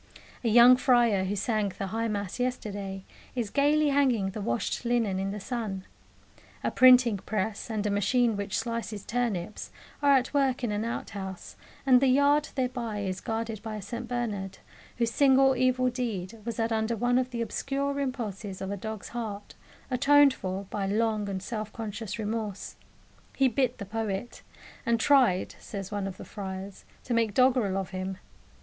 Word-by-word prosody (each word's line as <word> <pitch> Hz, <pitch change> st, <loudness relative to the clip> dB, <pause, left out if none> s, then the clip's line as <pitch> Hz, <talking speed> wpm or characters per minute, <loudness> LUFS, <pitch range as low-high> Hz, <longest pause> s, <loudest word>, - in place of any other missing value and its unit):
A 235 Hz, -, +2 dB
young 240 Hz, +3 st, +8 dB
friar, 240 Hz, -7 st, +3 dB
who 195 Hz, +2 st, -1 dB
sang 205 Hz, -1 st, 0 dB
the 195 Hz, -, -2 dB
High 230 Hz, +1 st, 0 dB
Mass 205 Hz, 0 st, -3 dB
yesterday, 200 Hz, -6 st, -3 dB, 0.3 s
is 230 Hz, -5 st, -2 dB
gaily 295 Hz, +1 st, +3 dB
hanging 255 Hz, -9 st, +2 dB
the 210 Hz, -, -6 dB
washed 120 Hz, -, -2 dB
linen 230 Hz, -5 st, +1 dB
in 195 Hz, 0 st, -1 dB
the 205 Hz, +1 st, -4 dB
sun. 205 Hz, -4 st, -4 dB, 0.8 s
A -, -, 0 dB
printing 250 Hz, -4 st, +6 dB
press, 210 Hz, +2 st, -3 dB
and 215 Hz, -2 st, -2 dB
a 210 Hz, -, +1 dB
machine 220 Hz, +3 st, +2 dB
which 200 Hz, -1 st, -2 dB
slices 230 Hz, -3 st, -4 dB
turnips, 215 Hz, -6 st, -2 dB, 0.3 s
are 285 Hz, -1 st, +5 dB
at 260 Hz, 0 st, +2 dB
work 270 Hz, -3 st, +1 dB
in 235 Hz, -, 0 dB
an 210 Hz, +1 st, -1 dB
outhouse, 195 Hz, -5 st, -6 dB, 0.3 s
and 255 Hz, -2 st, +6 dB
the 270 Hz, -, +4 dB
yard 285 Hz, +3 st, +4 dB
thereby 245 Hz, -5 st, -2 dB
is 190 Hz, -1 st, -3 dB
guarded 225 Hz, -1 st, -3 dB
by 220 Hz, -1 st, -5 dB
a 210 Hz, -, -5 dB
St 235 Hz, +4 st, -6 dB
Bernard, 215 Hz, -6 st, -3 dB, 0.4 s
whose 235 Hz, -1 st, +1 dB
single 270 Hz, 0 st, +5 dB
evil 255 Hz, 0 st, +2 dB
deed 225 Hz, -5 st, -4 dB
was 235 Hz, -, -3 dB
that 230 Hz, 0 st, 0 dB
under 220 Hz, +1 st, 0 dB
one 245 Hz, +3 st, +2 dB
of 255 Hz, 0 st, -1 dB
the 235 Hz, -2 st, -2 dB
obscure 280 Hz, +4 st, -2 dB
impulses 215 Hz, -8 st, -4 dB
of 190 Hz, 0 st, -4 dB
a 200 Hz, -, -3 dB
dog's 220 Hz, +1 st, -6 dB
heart 215 Hz, -4 st, -6 dB, 0.4 s
atoned 280 Hz, +2 st, +5 dB
for 190 Hz, -3 st, -4 dB
by 200 Hz, -2 st, -2 dB
long 215 Hz, 0 st, 0 dB
and 190 Hz, -1 st, -4 dB
self 215 Hz, 0 st, -4 dB
conscious 220 Hz, -1 st, -5 dB
remorse 215 Hz, -2 st, -4 dB, 0.6 s
he 270 Hz, -, +4 dB
bit 255 Hz, 0 st, 0 dB
the 200 Hz, -, -6 dB
poet; 215 Hz, +1 st, -4 dB, 0.4 s
and 235 Hz, -2 st, +1 dB
tried, 245 Hz, -8 st, +3 dB
says 195 Hz, -2 st, -7 dB
one 205 Hz, -2 st, -2 dB
of 190 Hz, -1 st, -7 dB
the -, -, -9 dB
friars, 190 Hz, -1 st, -7 dB, 0.2 s
to 245 Hz, -, -3 dB
make 230 Hz, -3 st, +1 dB
doggerel 250 Hz, -7 st, +3 dB
of 190 Hz, -1 st, -3 dB
him. 185 Hz, 0 st, -4 dB
225 Hz, 175 wpm, -28 LUFS, 200-250 Hz, 0.8 s, young